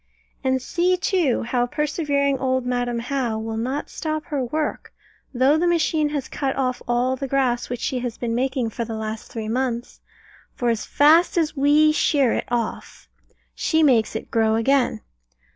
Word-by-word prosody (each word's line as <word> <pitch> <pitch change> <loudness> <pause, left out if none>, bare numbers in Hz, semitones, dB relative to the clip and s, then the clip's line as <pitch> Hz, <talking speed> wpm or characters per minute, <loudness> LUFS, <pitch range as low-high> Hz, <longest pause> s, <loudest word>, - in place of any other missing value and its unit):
And 260 0 +1
see, 360 +4 +1
too, 355 - +1
how 245 +1 0
persevering 285 -1 0
old 260 -1 0
Madam 245 -1 -1
How 240 -2 -2
will 220 0 -4
not 255 +6 -2
stop 310 -1 -3
her 290 -5 -2
work, 300 +5 -3 0.4
though 270 +4 +3
the 350 - +2
machine 315 -3 +1
has 285 -3 -3
cut 270 -2 -2
off 255 -2 -1
all 245 +2 +1
the 275 +1 -4
grass 255 -3 0
which 245 -1 -4
she 255 - -1
has 245 -2 -4
been 235 -2 -2
making 255 -1 -1
for 235 - -3
the 225 -1 -5
last 220 0 -5
three 220 -2 -5
months; 240 0 -3 0.5
for 240 -1 +1
as 225 -2 -2
fast 320 +5 +4
as 320 -2 +1
we 295 +2 +4
shear 285 -4 +2
it - - -2
off, 235 -2 -4 0.5
she 320 -1 +1
makes 235 -7 +3
it 220 - -6
grow 220 -1 +2
again. 245 -1 +1
260 Hz, 175 wpm, -22 LUFS, 240-295 Hz, 0.5 s, fast